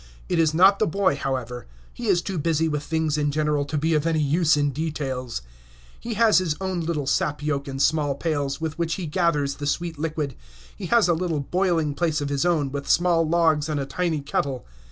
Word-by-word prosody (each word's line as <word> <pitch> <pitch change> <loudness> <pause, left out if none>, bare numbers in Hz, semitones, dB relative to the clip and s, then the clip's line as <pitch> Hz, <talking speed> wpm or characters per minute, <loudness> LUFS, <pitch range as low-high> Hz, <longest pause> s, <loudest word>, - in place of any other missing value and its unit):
It 175 - 0
is 160 -2 +3
not 190 +5 +5
the - - +2
boy, 190 -2 +1
however; 125 -3 -4 0.3
he 240 - -6
is 180 -4 +3
too 190 -4 -3
busy 160 +1 +1
with 150 -2 -1
things 160 -1 -1
in 145 0 +1
general 150 -1 0
to 150 +2 -3
be 160 +3 +1
of 155 +1 +1
any 160 -1 +1
use 155 +2 +3
in 145 -1 +1
details. 135 - -4 0.6
He 230 -1 -5
has 220 -3 +5
his 170 -5 -1
own 190 -2 -2
little 160 -3 -2
sap 150 0 0
yoke 145 -1 -1
and 135 -1 -5
small 145 -1 +2
pails, 140 -2 -2
with 160 0 -4
which 165 -1 0
he 185 - -5
gathers 150 -4 0
the 145 - -4
sweet 165 +1 -2
liquid. 150 -3 -2 0.4
He - - -6
has 235 -5 +4
a 175 - +3
little 165 -3 -1
boiling 170 -1 0
place 160 0 0
of 145 -1 -3
his 145 +4 0
own, 150 -6 +1
with 140 0 -5
small 170 -2 +3
logs 160 -3 +2
and 150 -2 -1
a 140 - -2
tiny 160 +2 -1
kettle. 140 -2 -2
155 Hz, 215 wpm, -24 LUFS, 145-170 Hz, 0.6 s, not